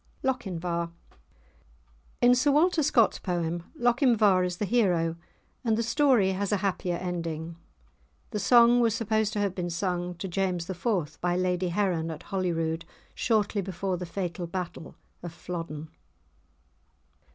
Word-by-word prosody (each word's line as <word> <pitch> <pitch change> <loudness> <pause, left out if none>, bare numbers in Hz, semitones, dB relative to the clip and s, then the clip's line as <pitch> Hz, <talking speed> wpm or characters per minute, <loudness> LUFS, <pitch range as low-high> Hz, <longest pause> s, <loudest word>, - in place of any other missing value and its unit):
*LOCHINVAR* 180 -9 -2 1.3
In 245 0 +6
Sir 255 +4 +3
Walter 320 +4 +3
Scott's 270 -6 +3
poem, 170 -2 -3
Lochinvar 235 -6 +4
is 180 -1 -2
the 210 - -1
hero, 180 -8 +2 0.5
and 225 -3 +1
the 230 - +1
story 240 -6 +3
has 195 +1 -2
a 205 - +3
happier 180 -2 -1
ending. 170 -2 -4 0.8
The 210 - -2
song 235 +4 +6
was 230 -2 +3
supposed 220 -1 0
to 210 - -1
have 200 -2 0
been 180 -2 -3
sung 175 0 -2
to 190 - -5
James 180 -2 -1
IV. 180 -5 -2
by 175 0 +1
Lady 180 0 0
Heron 175 -3 0
at 160 - -7
Holyrood 165 -4 -1 0.3
shortly 215 -3 +1
before 190 0 -3
the 180 0 -5
fatal 175 -1 -4
battle 175 -3 -6 0.3
of 175 - -6
Flodden. 165 -2 -6
185 Hz, 140 wpm, -27 LUFS, 170-220 Hz, 1.3 s, In